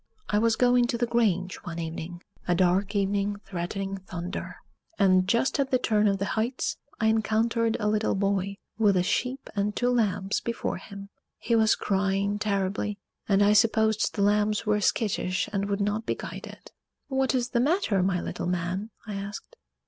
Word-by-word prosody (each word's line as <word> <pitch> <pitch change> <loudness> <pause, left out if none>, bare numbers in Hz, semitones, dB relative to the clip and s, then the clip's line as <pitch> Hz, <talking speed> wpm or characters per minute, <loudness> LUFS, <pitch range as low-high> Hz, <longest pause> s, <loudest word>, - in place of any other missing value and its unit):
I 210 - +2
was 230 0 +3
going 245 0 +4
to 240 -1 -1
the 240 - +1
grange 195 -7 +1
one 170 -1 -7
evening 170 +1 -6 0.2
a 175 - +3
dark 190 +3 +2
evening 200 +1 +1
threatening 195 +2 -4
thunder 185 -1 -6 0.4
and, 185 -2 +4
just 235 +7 +1
at 275 -1 +1
the 255 - +3
turn 215 -3 +2
of 195 -1 +2
the 200 - -2
Heights, 255 +8 -1 0.2
I 220 - +1
encountered 225 +1 +2
a 210 - 0
little 215 0 +1
boy 195 0 0 0.2
with 205 -4 +4
a 180 - +3
sheep 255 +7 -1
and 205 +1 0
two 245 0 +1
lambs 205 -4 +1
before 235 0 -3
him. 200 +1 -10 0.3
He 235 - 0
was 220 -1 +4
crying 200 +1 0
terribly, 200 0 -1 0.3
and 200 0 +4
I 205 +1 +5
supposed 220 0 +3
the 200 - +1
lambs 210 +1 +2
were 210 -1 +2
skittish 190 -2 0
and 200 0 -1
would 200 0 -1
not 210 +2 -1
be - - 0
guided. - - -9 0.4
"What 265 -1 +1
is 245 -1 0
the 240 - +1
matter, 270 - +2
my 180 -1 +1
little - - -4
man?" 180 +4 -2 0.2
I 210 - -6
asked. 200 - -7
205 Hz, 180 wpm, -27 LUFS, 195-225 Hz, 0.4 s, I